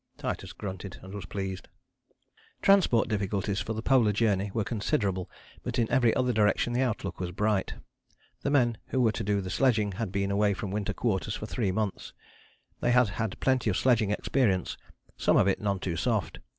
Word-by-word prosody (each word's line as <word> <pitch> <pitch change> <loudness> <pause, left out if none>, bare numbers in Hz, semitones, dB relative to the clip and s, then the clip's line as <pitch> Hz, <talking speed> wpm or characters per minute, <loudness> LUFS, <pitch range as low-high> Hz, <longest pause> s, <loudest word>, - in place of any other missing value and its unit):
Titus - - -4
grunted 95 -2 -7
and 95 +1 -10
was 100 -1 -6
pleased. 95 -2 -5 1.0
Transport 190 - +4
difficulties 100 -1 -1
for 110 - -3
the 110 +1 -5
Polar 120 -5 +4
Journey 105 -2 +1
were 110 +1 -1
considerable, 100 -4 -1 0.3
but 125 +1 -4
in 115 -2 +2
every 120 -3 +4
other 125 -1 +1
direction 110 +2 +2
the 125 - +1
outlook 105 -7 -2
was 90 -1 -2
bright. 105 +2 0 0.7
The - - -1
men 120 -6 +2
who 130 - -1
were 115 -3 +4
to - - -4
do 100 0 +1
the 95 -1 -5
sledging 110 -2 +2
had 100 0 -4
been 100 0 -1
away 100 0 +2
from 95 0 -5
Winter 100 0 -2
Quarters 105 -3 -1
for - - -5
three 110 -3 -1
months. 105 0 -3 0.7
They - - 0
had 125 -2 +4
had 110 +4 -3
plenty 130 -4 +2
of 95 - 0
sledging 115 -5 +3
experience, 105 -3 0 0.4
some - - +3
of - - +4
it 95 - +1
none 100 -2 0
too 90 -3 -3
soft. - - -1
105 Hz, 190 wpm, -28 LUFS, 100-120 Hz, 1.0 s, Transport